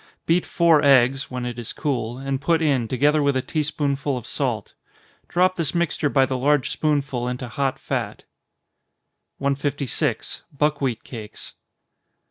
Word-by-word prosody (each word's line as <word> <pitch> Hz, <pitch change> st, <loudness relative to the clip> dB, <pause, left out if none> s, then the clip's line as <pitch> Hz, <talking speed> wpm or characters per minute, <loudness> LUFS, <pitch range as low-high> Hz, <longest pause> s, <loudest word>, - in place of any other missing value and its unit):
Beat 170 Hz, +2 st, +2 dB
four 165 Hz, -3 st, +4 dB
eggs, 135 Hz, -1 st, +4 dB
(when 125 Hz, -1 st, -4 dB
it 120 Hz, -1 st, -5 dB
is 115 Hz, -, -6 dB
cool,) 120 Hz, -5 st, -2 dB
and 135 Hz, 0 st, -3 dB
put 165 Hz, +3 st, +2 dB
in, 140 Hz, -7 st, +1 dB
together 145 Hz, +5 st, +2 dB
with 140 Hz, -2 st, +2 dB
a -, -, +1 dB
tea 155 Hz, -, -1 dB
spoonful 145 Hz, -2 st, -1 dB
of 120 Hz, -, -7 dB
salt. 120 Hz, -5 st, -2 dB, 0.5 s
Drop 185 Hz, +2 st, +2 dB
this 165 Hz, -2 st, -1 dB
mixture 170 Hz, -3 st, +1 dB
by 135 Hz, -1 st, +4 dB
the 130 Hz, 0 st, -2 dB
large 145 Hz, +1 st, +2 dB
spoonful 140 Hz, -5 st, 0 dB
into 125 Hz, 0 st, -4 dB
hot 135 Hz, +2 st, -1 dB
fat. -, -, -4 dB, 1.1 s
156. 140 Hz, -1 st, -1 dB, 0.2 s
_Buckwheat 140 Hz, -5 st, 0 dB
Cakes. 110 Hz, -4 st, -9 dB
140 Hz, 145 wpm, -23 LUFS, 125-150 Hz, 1.1 s, four